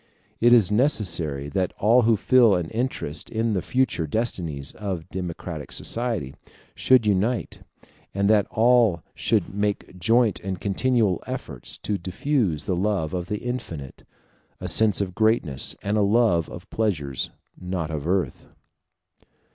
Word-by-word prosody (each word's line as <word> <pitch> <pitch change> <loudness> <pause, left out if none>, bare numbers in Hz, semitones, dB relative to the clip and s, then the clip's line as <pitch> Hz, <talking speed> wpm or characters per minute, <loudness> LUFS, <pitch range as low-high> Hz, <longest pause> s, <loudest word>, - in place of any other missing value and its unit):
It 120 +1 +5
is 110 -5 +5
necessary 85 - +1
that 95 +2 -1
all 115 +5 +4
who 115 -1 +3
feel 120 -2 +5
an 85 -2 -3
interest 110 - -3
in 115 0 0
the 95 - 0
future 125 -8 0
destinies 80 - -2
of 95 -6 -5
democratic 85 -3 -6
society 115 - -2 0.4
should 130 -3 +4
unite, 105 +3 0 0.5
and 100 0 0
that 105 -1 +4
all 115 -7 +3
should - - 0
make 100 -2 -2
joint 115 +4 +3
and 95 -1 -5
continual 105 -2 +1
efforts - - -6
to 105 -2 -1
diffuse 95 - -1
the 95 - 0
love 95 -4 -1
of 90 -1 -3
the 105 +1 -4
infinite, 100 - -6 0.6
a 90 - -5
sense 105 +3 +3
of 95 -2 -3
greatness, 110 - +1
and 105 +2 0
a - - +3
love 100 -5 +3
of 85 +3 -10
pleasures 75 - -1 0.3
not 90 -3 -4
of 75 0 -4
earth. 95 +1 -1
100 Hz, 140 wpm, -24 LUFS, 85-115 Hz, 0.6 s, It